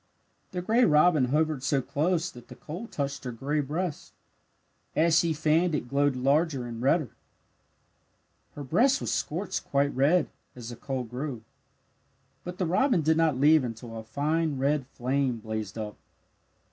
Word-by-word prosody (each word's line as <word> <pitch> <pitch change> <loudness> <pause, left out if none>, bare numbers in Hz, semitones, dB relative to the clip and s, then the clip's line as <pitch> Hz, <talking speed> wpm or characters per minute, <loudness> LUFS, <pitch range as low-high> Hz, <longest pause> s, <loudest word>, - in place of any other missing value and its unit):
The 180 -1 -4
gray 230 +6 +3
robin 150 - +5
hovered 150 +1 0
so 135 +1 +1
close 160 +6 -1
that 120 -1 -14
the - - -11
coal 175 +10 -7
touched 140 -6 -4
her 125 - -4
gray 140 +6 -2
breast. 155 +3 -3 0.8
As 165 +1 +4
she 170 - +1
fanned 155 +2 +2
it 130 - -3
glowed 140 +1 +1
larger 140 +1 +1
and 115 -1 -6
redder. 140 +2 +2 1.4
Her 145 - -6
breast 255 - +3
was - - -3
scorched 175 +6 -2
quite 140 0 0
red, 150 +6 +2 0.2
as 120 -2 -8
the 120 - -7
coal 130 +1 -4
grew. 125 0 -5 1.0
But 180 0 -7
the 185 - 0
robin 185 - +2
did 160 +1 +3
not 160 -5 +2
leave 150 +1 +5
until 115 -1 -6
a 110 - -6
fine 150 +5 -1
red 140 0 0
flame 130 -1 -1
blazed 110 -2 -5
up. 105 -2 -5
145 Hz, 160 wpm, -27 LUFS, 125-165 Hz, 1.4 s, robin